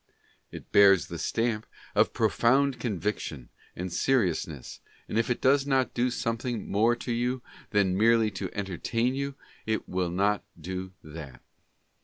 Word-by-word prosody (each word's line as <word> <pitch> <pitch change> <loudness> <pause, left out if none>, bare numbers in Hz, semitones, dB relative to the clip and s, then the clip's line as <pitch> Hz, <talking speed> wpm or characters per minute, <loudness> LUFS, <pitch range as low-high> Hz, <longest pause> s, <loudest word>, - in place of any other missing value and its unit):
It - - -10
bears 100 -6 +6
the 85 - -5
stamp 115 -2 -1 0.3
of - - +3
profound 135 +2 +2
conviction 100 - -3 0.3
and 90 0 -5
seriousness, 85 - 0 0.3
and - - -5
if 115 - 0
it 125 - -1
does 135 +1 +4
not 135 -2 +2
do 125 +1 +1
something 115 -1 -2
more 115 +4 +3
to 120 +1 -5
you 120 +2 -1 0.3
than 100 -3 +2
merely 110 +1 +4
to 95 -1 -4
entertain 110 +6 -1
you, 140 0 -3 0.3
it 110 0 -1
will 90 -1 -1
not 100 +3 +1 0.2
do 95 +3 -5
that. 75 -5 -10
105 Hz, 145 wpm, -28 LUFS, 95-120 Hz, 0.3 s, bears